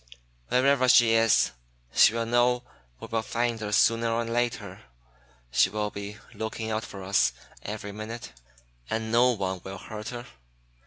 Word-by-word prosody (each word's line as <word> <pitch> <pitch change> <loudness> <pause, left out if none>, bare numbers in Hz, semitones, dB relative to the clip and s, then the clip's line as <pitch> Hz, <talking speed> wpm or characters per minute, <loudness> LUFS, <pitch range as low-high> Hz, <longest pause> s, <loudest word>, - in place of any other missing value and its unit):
Wherever 130 0 +3
she 120 -2 +6
is, 115 -1 +4 0.4
she 110 - +6
will 115 0 -1
know 120 +1 +2 0.4
we - - -8
will 115 0 -1
find 115 +1 -1
her 105 -1 -4
sooner 115 +2 +3
or 115 +1 0
later. 115 -5 -2 0.7
She 95 - +4
will 105 +1 -2
be 100 +1 -7 0.2
looking 110 0 -4
out 110 +1 -1
for 95 -1 -9
us 95 +2 +2 0.3
every 105 - -6
minute. 110 - -7 0.6
And 110 0 -2
no 125 +2 +5
one 95 -4 -3
will 95 0 -7
hurt 105 +3 -7
her. 120 -1 -7
115 Hz, 155 wpm, -27 LUFS, 105-120 Hz, 0.7 s, she